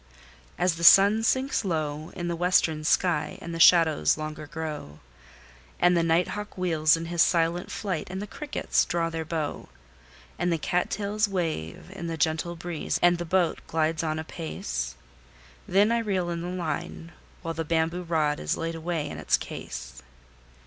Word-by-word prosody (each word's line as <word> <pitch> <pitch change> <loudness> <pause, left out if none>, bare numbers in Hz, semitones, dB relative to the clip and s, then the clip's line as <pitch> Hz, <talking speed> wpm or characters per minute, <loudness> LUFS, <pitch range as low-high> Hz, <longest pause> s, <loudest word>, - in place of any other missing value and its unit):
As 180 -2 +1
the 170 - -5
sun 200 +5 +8
sinks 260 +2 +1
low 155 -4 -2
in 175 -1 -4
the 170 - -1
western 165 -3 +2
sky, 165 0 +1
and 170 - -7
the 165 - -5
shadows 160 - +5
longer 155 0 -6
grow, 150 - -6 0.8
And 175 0 +4
the 170 - +3
night 165 +2 +2
hawk 210 -1 -6
wheels 165 -3 +3
in 165 - -5
his 170 0 0
silent 170 +1 +2
flight, 185 -7 -3
and 190 +1 -5
the 205 - -4
crickets 290 +7 -1
draw 165 -1 -1
their 160 0 -4
bow, 155 -2 -4 0.7
And 175 +1 +1
the 165 - +1
cat 175 +3 -1
tails 210 +1 0
wave 165 - -3
in 195 -3 -6
the 165 -1 -3
gentle 160 +3 0
breeze, 170 -2 -3
and 175 0 +5
the 175 - -3
boat 175 0 +1
glides 160 0 0
on 155 -1 -2
apace; 65 - -4 0.7
Then 200 +4 +4
I 235 - +2
reel 190 -6 -1
in 170 0 -3
the 175 - -4
line, 170 -1 -4 0.3
while 165 -1 -3
the 165 0 -3
bamboo 165 +2 0
rod 155 -4 0
is 75 - -1
laid 165 0 -3
away 165 -2 -3
in - - -7
its - - +2
case. - - -8
165 Hz, 175 wpm, -26 LUFS, 155-180 Hz, 0.8 s, sun